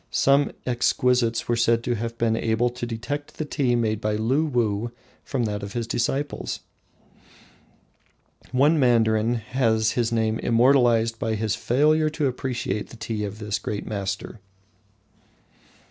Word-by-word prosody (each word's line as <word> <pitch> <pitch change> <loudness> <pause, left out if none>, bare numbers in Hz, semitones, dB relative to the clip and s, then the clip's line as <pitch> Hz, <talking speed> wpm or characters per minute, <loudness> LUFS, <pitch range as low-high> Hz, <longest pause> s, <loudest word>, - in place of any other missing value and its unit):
Some 140 +1 +3
exquisites 125 -1 +1
were 120 - +1
said 115 0 +2
to 120 - 0
have 115 +1 -4
been 115 -1 +1
able 115 +2 +1
to 120 0 -5
detect 145 +6 -5
the 155 - -2
tea 135 -5 0
made 110 -2 0
by 105 0 0
Luwuh 120 -3 0 0.3
from 130 -4 -2
that 105 -2 -2
of 100 0 -7
his 120 -1 -2
disciples. 135 +5 -2 1.9
One 145 +5 +3
mandarin 115 -2 +3
has 115 -2 +1
his 120 -2 0
name 110 -1 0
immortalised 120 -2 +3
by 110 -1 -1
his 110 -1 -1
failure 150 +7 +2
to 155 -1 -2
appreciate 125 -5 -2
the 120 - -12
tea 110 -2 -3
of 105 0 -5
this 105 -1 -3
great 105 -1 -4
master. 100 +1 -4
115 Hz, 140 wpm, -24 LUFS, 110-125 Hz, 1.9 s, Some